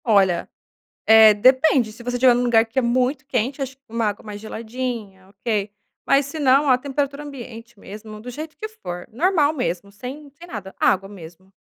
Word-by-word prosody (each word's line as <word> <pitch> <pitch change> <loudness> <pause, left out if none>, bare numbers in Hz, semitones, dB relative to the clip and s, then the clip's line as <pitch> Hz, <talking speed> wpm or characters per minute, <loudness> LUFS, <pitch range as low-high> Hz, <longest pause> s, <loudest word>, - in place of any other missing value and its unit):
Olha, 195 -6 +3 0.6
eh, 220 -1 +8
depende. 255 +2 +4
Se 230 +2 -13
você 245 +1 -3
estiver 250 0 +6
num 245 - 0
lugar 230 -2 +4
que 225 +3 -16
é - - +5
muito 255 +3 0
quente, 265 +2 -2
acho 270 0 -4
que 270 - -51
uma 230 0 -1
água 210 0 -3
mais 210 -1 -8
geladinha, 220 -3 -6
ok. 210 -1 -2 0.3
Mas 275 0 +3
se 310 +3 -7
não, 275 +1 +4
a 255 - +5
temperatura 280 +2 -3
ambiente 235 -5 -10
mesmo, 215 +2 -10
do 245 - -8
jeito 305 +5 -7
que 435 - -5
for, 180 - -8
normal 310 - +2
mesmo, 200 - -3
sem 260 +8 -9
sem 335 +5 -14
nada. 205 - -8
Água 195 0 +2
mesmo. 185 0 -13
240 Hz, 190 wpm, -22 LUFS, 210-270 Hz, 0.6 s, eh